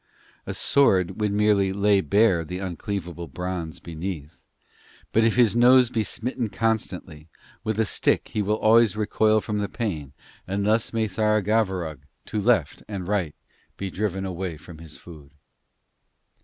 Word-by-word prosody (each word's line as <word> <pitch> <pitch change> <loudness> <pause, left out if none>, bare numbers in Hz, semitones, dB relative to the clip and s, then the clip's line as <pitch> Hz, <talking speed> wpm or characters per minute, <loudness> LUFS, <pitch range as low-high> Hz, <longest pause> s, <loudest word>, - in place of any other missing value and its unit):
A - - -4
sword 95 -8 +2
would 105 -1 +1
merely 100 -2 +2
lay 100 0 +3
bare 95 +1 +3
the 90 +3 -6
uncleavable 90 -2 -5
bronze 85 +1 -5
beneath, 80 -2 -7 0.7
but 115 - +4
if 115 -1 +2
his 120 -3 +4
nose 125 0 +6
be 110 - 0
smitten 120 +2 -3
constantly 95 -8 -3 0.3
with 110 -1 -2
a 110 - +3
stick - - +1
he 105 - -2
will 105 +2 0
always 110 -2 +4
recoil 110 0 +2
from 105 +2 -3
the 100 -1 -2
pain, 80 - -4 0.3
and 100 +2 -1
thus 110 +2 +2
may 115 -1 0
Tharagavverug, 105 - 0 0.3
to 105 - -3
left - - +1
and 95 -4 -5
right, 95 -7 -1 0.4
be 100 -1 -4
driven 95 -1 -2
away 90 -3 -4
from 80 0 -13
his 80 -2 -10
food.' 75 -4 -14
100 Hz, 150 wpm, -24 LUFS, 90-110 Hz, 0.7 s, nose